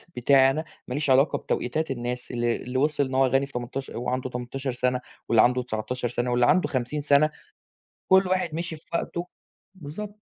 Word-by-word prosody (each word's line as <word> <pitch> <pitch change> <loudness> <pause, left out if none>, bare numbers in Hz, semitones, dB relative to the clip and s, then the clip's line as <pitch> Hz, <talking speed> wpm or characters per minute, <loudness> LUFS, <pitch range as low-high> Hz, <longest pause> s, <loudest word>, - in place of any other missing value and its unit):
بتاعي 135 +2 +5
أنا، 155 +4 -3 0.2
ما 125 - -4
ليش 145 +1 -1
علاقة 135 +3 +4
بتوقيتات 155 +5 -2
الناس 125 0 -4
اللي 120 -1 0
اللي 125 +1 -4
وصل 145 +1 +2
إن 130 0 -4
هو 135 0 +5
غني 135 +2 +2
في 140 - -14
تمنتاش 125 +2 -5
وهو 120 - -4
عنده 130 +1 -2
18 125 +2 -4
سنة 125 0 0 0.3
واللي 115 -2 +6
عنده 125 +2 +3
19 125 +1 -3
سنة 120 +1 -2
واللي 120 0 +3
عنده 180 +8 +4
50 130 +2 -2
سنة، 145 +1 +4 0.8
كُل 190 0 +5
واحد 185 -3 0
مِشِي 170 -1 -4
في 155 - -20
وقته 170 +1 -2 0.5
بالضبط. 200 +6 -8
130 Hz, 190 wpm, -26 LUFS, 125-150 Hz, 0.8 s, واللي